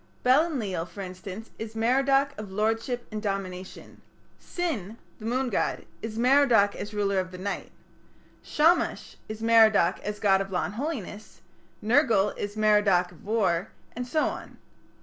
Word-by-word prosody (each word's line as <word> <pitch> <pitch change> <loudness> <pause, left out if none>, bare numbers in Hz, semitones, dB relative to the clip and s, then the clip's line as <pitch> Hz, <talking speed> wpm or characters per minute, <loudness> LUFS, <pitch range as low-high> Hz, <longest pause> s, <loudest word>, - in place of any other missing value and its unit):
Bel 270 +6 +5
Enlil, 200 - -3
for 200 - -9
instance, 185 +3 -8
is 225 0 -7
Merodach 270 +4 +2
of 215 -4 -8
lordship 225 +4 -1
and 215 0 -4
domination; 190 -3 -6 0.4
Sin, 235 - -4 0.2
the 215 - -9
moon 255 +2 0
god, - - -1 0.2
is 225 0 -6
Merodach 245 -5 +4
as 210 - -6
ruler 200 -2 0
of 185 0 -5
night; 200 +2 -4 0.7
Shamash 325 +4 +1
is 215 +1 -6
Merodach 220 -6 +5
as 210 0 -5
god 195 -2 +3
of 195 - -4
law 180 - 0
and - - -6
holiness; 225 - -6 0.4
Nergal 220 -4 +3
is 205 +1 -5
Merodach 205 -4 +3
of 175 - -18
war; 200 -4 0 0.3
and 245 +1 -4
so 310 +4 +1
on. - - -6
215 Hz, 150 wpm, -27 LUFS, 195-245 Hz, 0.7 s, Bel